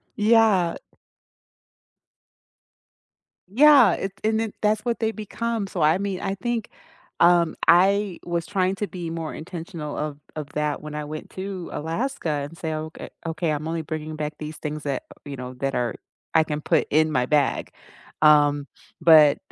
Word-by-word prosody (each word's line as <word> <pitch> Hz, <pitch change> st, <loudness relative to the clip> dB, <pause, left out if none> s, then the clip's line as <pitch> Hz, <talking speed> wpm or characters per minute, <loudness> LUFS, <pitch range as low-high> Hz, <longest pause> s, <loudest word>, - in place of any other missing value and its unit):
Yeah. 210 Hz, -5 st, +3 dB, 2.7 s
Yeah, 275 Hz, +5 st, +6 dB
it's 195 Hz, 0 st, -4 dB
and 220 Hz, 0 st, +1 dB
then, 225 Hz, -2 st, -2 dB
that's 215 Hz, 0 st, +2 dB
what 235 Hz, -1 st, -1 dB
they 225 Hz, -1 st, 0 dB
become, 220 Hz, 0 st, -3 dB
so 180 Hz, -3 st, -4 dB
I 155 Hz, +3 st, +4 dB
mean, 195 Hz, -1 st, -3 dB
I 195 Hz, -1 st, -2 dB
think, 235 Hz, 0 st, -3 dB, 0.5 s
um, 170 Hz, -1 st, +4 dB
I 195 Hz, +2 st, +4 dB
was 170 Hz, -1 st, -2 dB
trying 185 Hz, +2 st, 0 dB
to 205 Hz, +1 st, -3 dB
be 175 Hz, -3 st, -6 dB
more 165 Hz, -1 st, -4 dB
intentional 165 Hz, -2 st, -7 dB
of 150 Hz, -1 st, -3 dB, 0.2 s
of 150 Hz, -2 st, -5 dB
that 150 Hz, -1 st, -1 dB
when 150 Hz, 0 st, -7 dB
I 150 Hz, -, -3 dB
went 155 Hz, +1 st, -7 dB
to 190 Hz, -2 st, -6 dB
Alaska, 165 Hz, -, -3 dB
and 145 Hz, +2 st, -3 dB
say, 160 Hz, -1 st, -3 dB
"Okay 155 Hz, +1 st, -6 dB, 0.2 s
okay, 165 Hz, 0 st, -1 dB
I'm 155 Hz, +1 st, -3 dB
only 165 Hz, 0 st, -2 dB
bringing 155 Hz, 0 st, -5 dB
back 150 Hz, 0 st, -3 dB
these 155 Hz, 0 st, -6 dB
things 150 Hz, 0 st, -5 dB
that" 140 Hz, -3 st, -2 dB, 0.2 s
you 140 Hz, -1 st, -6 dB
know, 125 Hz, 0 st, -7 dB
"that 135 Hz, +1 st, -2 dB
are 120 Hz, -2 st, -1 dB, 0.4 s
I 160 Hz, -, +5 dB
can 150 Hz, -1 st, -4 dB
put 160 Hz, +1 st, +1 dB
in 155 Hz, +1 st, +3 dB
my 125 Hz, -4 st, +1 dB
bag." 145 Hz, 0 st, +1 dB, 0.5 s
Um, 145 Hz, -1 st, +5 dB, 0.3 s
but 155 Hz, -3 st, +7 dB
165 Hz, 165 wpm, -24 LUFS, 150-195 Hz, 2.7 s, but